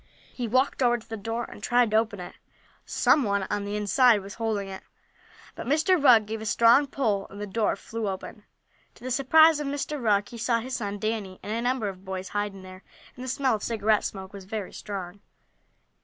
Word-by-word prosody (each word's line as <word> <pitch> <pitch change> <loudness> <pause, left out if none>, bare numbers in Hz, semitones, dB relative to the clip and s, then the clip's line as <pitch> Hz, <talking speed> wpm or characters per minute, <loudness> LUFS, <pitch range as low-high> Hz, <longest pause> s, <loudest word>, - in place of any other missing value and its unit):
He 245 -2 -3
walked 260 +4 +1
over 240 -1 +4
to 230 - -15
the 225 - -5
door, 225 +3 -3
and 210 - -10
tried 240 0 +2
to 215 - +4
open 220 -3 0
it. 180 - -8 0.5
Some 295 - +3
one 200 -4 0
on 205 -1 -1
the 205 +1 -3
inside 210 +2 +4
was 195 +1 -9
holding 220 -3 -2
it, 190 0 -8 0.7
but - - -8
Mr. 315 +4 +2
Rugg 235 -6 +7
gave 220 +1 -5
a - - -6
strong 235 +6 +5
pull, 220 -8 -1
and 200 - -11
the 210 - -3
door 210 +2 0
flew 225 -2 -4
open. 190 +2 -7 0.5
To - - -18
the 255 - -4
surprise 310 +5 +5
of 295 - -3
Mr. 285 0 -3
Rugg 205 -3 +2
he 235 - -9
saw 235 0 +1
his 255 +3 -5
son 205 -3 -4
Danny, 210 -3 -3
and 210 - -5
a 230 - -1
number 245 -3 0
of 190 -1 -7
boys, 190 -1 -5
hiding 205 -2 -3
there, 185 0 -11 0.3
and 250 - -8
the - - -6
smell 260 0 +1
of 215 - -2
cigarette 215 -2 +1
smoke 190 0 -6
was 195 -2 -9
very 205 -1 -5
strong. 195 -2 -7
220 Hz, 215 wpm, -26 LUFS, 200-245 Hz, 0.7 s, Rugg